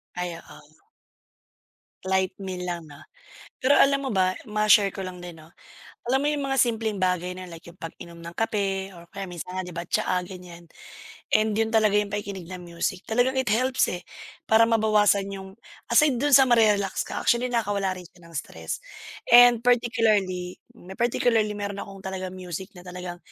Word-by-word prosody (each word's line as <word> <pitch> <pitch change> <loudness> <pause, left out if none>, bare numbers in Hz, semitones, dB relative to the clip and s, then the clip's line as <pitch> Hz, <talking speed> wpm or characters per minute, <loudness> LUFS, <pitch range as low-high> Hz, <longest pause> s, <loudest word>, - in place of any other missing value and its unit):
Ay 180 -1 -3
oo. 150 -1 -17 1.2
Light 190 0 0
meal 180 -1 -5
lang 170 -1 -4
'no. 145 - -13 0.6
Pero 260 +3 +2
alam 275 0 +4
mo 265 - -2
ba, 185 -1 +2
ma-share 210 -2 +4
ko - - -7
lang 185 -1 -6
din 165 -2 -10
'no, 155 - -16 0.6
alam 265 - +4
mo 290 - 0
yung 295 -1 -1
mga 270 - 0
simpleng 225 -4 +1
bagay 180 -1 0
na 185 - -7
like 165 -1 -11
yung 175 - -20
pag-inom 170 +1 -9
ng 170 +1 -9
kape 195 -3 -1
or 170 -1 -14
kaya 195 -1 -5
minsan 175 +1 -7
nga 185 - -1
di - - -7
ba 170 - -4
tsaa 180 0 0
ganiyan 175 -2 -11 0.7
and 215 0 +3
yun 225 0 +2
talaga 215 -2 +4
yung 205 -1 0
pakikinig 200 -4 -5
ng 180 -1 -7
music 170 +2 -3
talagang 245 +4 +1
it 260 - 0
helps 255 +4 +2
eh 180 - -4 0.5
para 220 +1 +5
mabawasan 215 -3 +3
yung 190 0 -8 0.4
aside 270 +1 +5
dun 290 +2 +1
sa 270 - +9
mare-relax 210 -5 +3
ka, - - -4
actually 245 0 +3
nakawala 205 -5 0
rin - - -9
siya 175 -2 -21
ng - - -16
stress - - -5 0.5
and 240 -1 +8
particularly 215 -7 +1 0.2
may 190 -1 -11
particularly 230 -2 +2
meron 200 -1 -4
akong 195 -1 -10
talagang 185 -1 -5
music 185 +2 -6
na - - -11
talagang 180 -1 -7
195 Hz, 180 wpm, -25 LUFS, 180-225 Hz, 1.2 s, sa